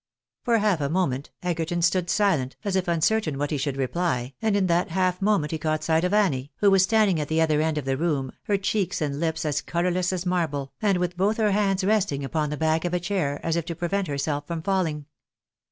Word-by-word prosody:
For 235 -1 +2
half 205 -7 +1
a 140 - 0
moment 145 -6 -1
Egerton 175 0 -1
stood 175 0 +2
silent, 190 -10 +1
as 200 -2 0
if 185 -1 0
uncertain 170 -1 +1
what 145 +2 -2
he 150 - 0
should 135 0 -2
reply, 135 -2 -1
and 220 -2 +1
in 195 - +2
that 175 0 +1
half 185 +1 0
moment 195 -7 +1
he 160 - -3
caught 155 0 -1
sight 160 0 +2
of 180 - +1
Annie, 165 -10 +1
who 200 -1 +3
was 195 -1 +5
standing 200 -3 +3
at 150 - -2
the 160 +2 0
other 155 -2 +3
end 160 -1 0
of 150 - -3
the 135 0 0
room, 140 -5 -1
her 205 - +1
cheeks 195 -1 -1
and 150 -2 -1
hps 160 +2 -2
as 145 -1 0
colourless 180 +1 0
as 185 -1 -3
marble, 155 -7 -1
and 200 -3 +2
with 180 0 -2
both 205 +4 +1
her 215 -2 +2
hands 195 -1 +1
resting 190 -9 +1
upon 150 +1 -1
the 150 - -4
back 160 +1 +1
of 175 0 -1
a - - +1
chair, 175 -6 -1
as 165 - +1
if 170 - 0
to 170 -1 -5
prevent 185 +3 -1
herself 145 0 -2
from 165 -2 -4
falling. 165 -6 -1
170 Hz, 235 wpm, -25 LUFS, 150-190 Hz, -, was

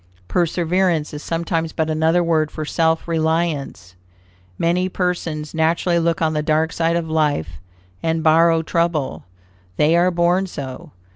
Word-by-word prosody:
Perseverance 175 -2 0
is 150 - -6
sometimes 165 0 -2
but 160 -1 -1
another 160 +2 +2
word 160 -2 +1
for 155 - -6
self 160 +1 0
reliance. 160 - -1 0.6
Many 180 +2 +1
persons 170 -5 -3
naturally 165 +2 +1
look 165 0 0
on 160 0 +1
the 150 - 0
dark 155 +1 +1
side 165 0 +1
of 170 -1 -1
life, 145 - -1 0.4
and 160 -1 -1
borrow 165 +1 +4
trouble. 170 -3 -1 0.5
They 155 +3 +3
are 175 +1 +4
born 175 +2 +1
so. 130 -7 -7
165 Hz, 140 wpm, -20 LUFS, 155-170 Hz, 0.6 s, borrow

